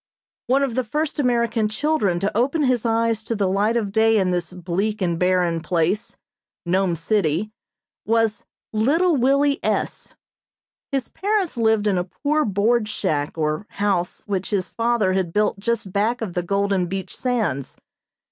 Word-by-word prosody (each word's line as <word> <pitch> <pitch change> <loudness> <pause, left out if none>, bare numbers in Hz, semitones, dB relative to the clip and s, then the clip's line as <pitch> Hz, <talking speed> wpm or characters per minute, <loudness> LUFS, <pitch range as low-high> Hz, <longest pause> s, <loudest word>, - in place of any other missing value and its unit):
One 270 +3 +3
of 270 -4 -1
the 255 +2 0
first 300 +6 -2
American 235 -4 +1
children 215 - 0
to 200 +1 -1
open 275 +7 +1
his 250 -3 +1
eyes 230 -1 +1
to 230 +1 -3
the 200 -2 +1
light 205 +5 +1
of 210 -4 -2
day 220 +1 +4
in 190 -3 +2
this 175 -2 -2
bleak 185 +4 -2
and 170 -3 -1
barren 180 -2 +2
place 175 +5 -1 0.5
Nome 185 0 +1
City 180 +2 0 0.5
was 225 -1 +1 0.3
Little 310 +11 +3
Willie 280 +2 +2
S. - - -2 0.8
His 270 -3 -1
parents 400 -5 -1
lived 220 -2 +2
in 195 -3 +2
a - - 0
poor 300 +11 -1
board 215 +2 +1
shack 155 -8 -2
or 155 +5 -1
house 195 -4 -1
which 195 -3 -2
his 190 -4 -1
father 230 -5 +1
had 185 -3 0
built 210 +1 +1
just 215 -3 -2
back 225 +5 +1
of 205 -6 -4
the 180 - 0
golden 195 0 0
beach 190 +1 -5
sands. 220 - -2
210 Hz, 160 wpm, -22 LUFS, 185-235 Hz, 0.8 s, day